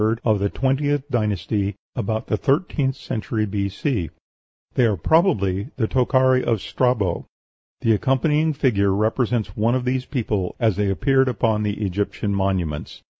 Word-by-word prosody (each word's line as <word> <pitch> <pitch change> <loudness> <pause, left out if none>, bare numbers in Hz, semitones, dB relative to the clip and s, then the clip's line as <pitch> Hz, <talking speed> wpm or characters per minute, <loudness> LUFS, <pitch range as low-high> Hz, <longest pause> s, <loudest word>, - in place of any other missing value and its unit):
of 110 -3 +3
the 100 +1 0
twentieth 140 +3 0
dynasty, 105 -3 -1 0.2
about 110 -1 -2
the - - 0
thirteenth 135 - 0
century 110 0 -3
B.C. 100 - -2 0.6
They 125 - +3
are 105 -4 +1
probably 105 - +2
the 115 -4 0
Tochari 130 0 +3
of 115 -3 +1
Strabo. 110 -7 0 0.5
The 115 - +3
accompanying 150 +7 +1
figure 100 -9 +2
represents 110 -1 0
one 115 +3 +2
of 130 -1 -1
these 130 0 -1
people 105 -8 -2
as 110 -5 +2
they 100 0 0
appear 135 +8 +2
upon 115 -4 +1
the 105 0 -2
Egyptian 100 +2 -2
monuments. 95 -6 -2
110 Hz, 140 wpm, -22 LUFS, 100-130 Hz, 0.6 s, of